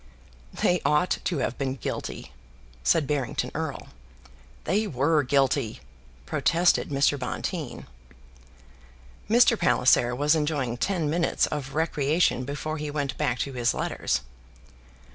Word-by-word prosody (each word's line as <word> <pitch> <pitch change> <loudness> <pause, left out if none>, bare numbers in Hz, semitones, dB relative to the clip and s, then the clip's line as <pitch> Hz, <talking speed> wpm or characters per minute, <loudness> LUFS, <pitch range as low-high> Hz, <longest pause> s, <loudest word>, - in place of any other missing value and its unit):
"They 180 -1 +1
ought 150 +5 +2
to 175 - 0
have - - -5
been 135 -1 -1
guilty," 105 - -5 0.5
said 160 -3 +3
Barrington 140 -3 -2
Erle. - - -4 0.7
"They 210 +6 0
were 150 +1 +2
guilty," 135 -3 +1 0.5
protested 165 - +2
Mr. 140 0 +2
Bonteen. 125 - -4 1.4
Mr. 235 +1 +5
Palliser 125 -7 +3
was 145 +4 +3
enjoying 150 -6 -1
ten 170 +2 0
minutes 165 +3 +1
of 140 -2 -5
recreation 150 -3 +1
before 155 +3 -4
he 150 0 -4
went 145 -3 -2
back 125 - 0
to 140 - -8
his 120 -2 0
letters. 65 - -1
145 Hz, 120 wpm, -26 LUFS, 130-160 Hz, 1.4 s, Mr